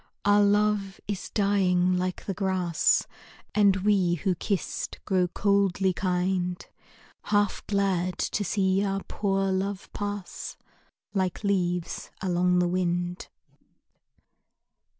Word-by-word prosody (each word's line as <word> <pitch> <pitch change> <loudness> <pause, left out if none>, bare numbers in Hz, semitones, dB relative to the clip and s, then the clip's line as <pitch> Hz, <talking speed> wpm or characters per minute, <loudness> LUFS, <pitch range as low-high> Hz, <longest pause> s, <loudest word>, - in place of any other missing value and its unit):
Our 205 0 +5
love 205 -1 +2
is 200 -2 -4
dying 185 -3 +2
like 185 0 -2
the 195 - -2
grass, 185 -4 +1 0.5
And 200 -2 +5
we 195 -4 +3
who 185 +3 0
kissed 185 0 -3
grow 185 -3 +2
coldly 195 0 +1
kind, 180 -1 -1 0.7
Half 205 -1 +1
glad 190 -3 0
to 210 - -1
see 190 0 +1
our 195 -1 -1
poor 195 -1 -1
love 190 +1 -3
pass 205 -2 -5 0.6
Like 190 0 -1
leaves 180 -4 -1
along 180 -1 +2
the 180 0 +3
wind. 175 0 -1
190 Hz, 110 wpm, -27 LUFS, 180-200 Hz, 0.7 s, Our